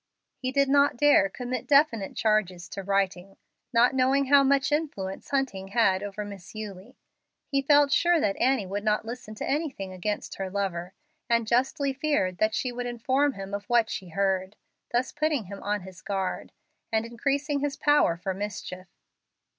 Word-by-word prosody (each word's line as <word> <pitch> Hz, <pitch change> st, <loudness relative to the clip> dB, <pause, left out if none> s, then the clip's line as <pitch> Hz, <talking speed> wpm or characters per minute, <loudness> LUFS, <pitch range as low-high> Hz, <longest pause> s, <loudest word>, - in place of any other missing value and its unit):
He 255 Hz, 0 st, -2 dB
did 275 Hz, +1 st, +3 dB
not 280 Hz, -1 st, +3 dB
dare 290 Hz, -8 st, +5 dB
commit 250 Hz, +2 st, -5 dB
definite 280 Hz, -8 st, +3 dB
charges 195 Hz, -5 st, 0 dB
to 195 Hz, -, -5 dB
writing, 195 Hz, -1 st, -1 dB, 0.3 s
not 245 Hz, +1 st, +4 dB
knowing 265 Hz, +2 st, +3 dB
how 285 Hz, 0 st, +7 dB
much 275 Hz, +1 st, +2 dB
influence 275 Hz, -12 st, -3 dB
Hunting 265 Hz, -9 st, -1 dB
had 195 Hz, -3 st, +2 dB
over 205 Hz, +1 st, -5 dB
Miss 200 Hz, -1 st, -10 dB
Eulie. 215 Hz, +2 st, -8 dB, 0.5 s
He 275 Hz, -1 st, 0 dB
felt 285 Hz, 0 st, +4 dB
sure 345 Hz, +3 st, +4 dB
that 200 Hz, -7 st, +1 dB
Annie 260 Hz, -4 st, +2 dB
would 200 Hz, +2 st, -4 dB
not 215 Hz, 0 st, +1 dB
listen 230 Hz, -2 st, -7 dB
to -, -, -5 dB
anything 270 Hz, -, -2 dB
against 205 Hz, +3 st, -4 dB
her 190 Hz, -1 st, -3 dB
lover, 185 Hz, -2 st, -3 dB, 0.3 s
and 235 Hz, -1 st, +2 dB
justly 265 Hz, +4 st, +1 dB
feared 265 Hz, -11 st, 0 dB
that 215 Hz, 0 st, +2 dB
she 250 Hz, -, -1 dB
would 245 Hz, 0 st, -4 dB
inform 260 Hz, +4 st, +1 dB
him 195 Hz, -2 st, -8 dB
of 200 Hz, 0 st, -4 dB
what 235 Hz, -1 st, +2 dB
she 185 Hz, -3 st, -5 dB
heard, 190 Hz, +1 st, -1 dB, 0.4 s
thus 245 Hz, +2 st, 0 dB
putting 300 Hz, -4 st, 0 dB
him 200 Hz, +1 st, -9 dB
on 205 Hz, 0 st, -1 dB
his 185 Hz, -1 st, -12 dB
guard, 195 Hz, -2 st, -3 dB, 0.4 s
and 220 Hz, 0 st, +1 dB
increasing 280 Hz, +5 st, -1 dB
his 285 Hz, 0 st, -2 dB
power 290 Hz, -, +3 dB
for 190 Hz, +2 st, -3 dB
mischief. 190 Hz, -2 st, -6 dB
225 Hz, 170 wpm, -27 LUFS, 195-275 Hz, 0.5 s, how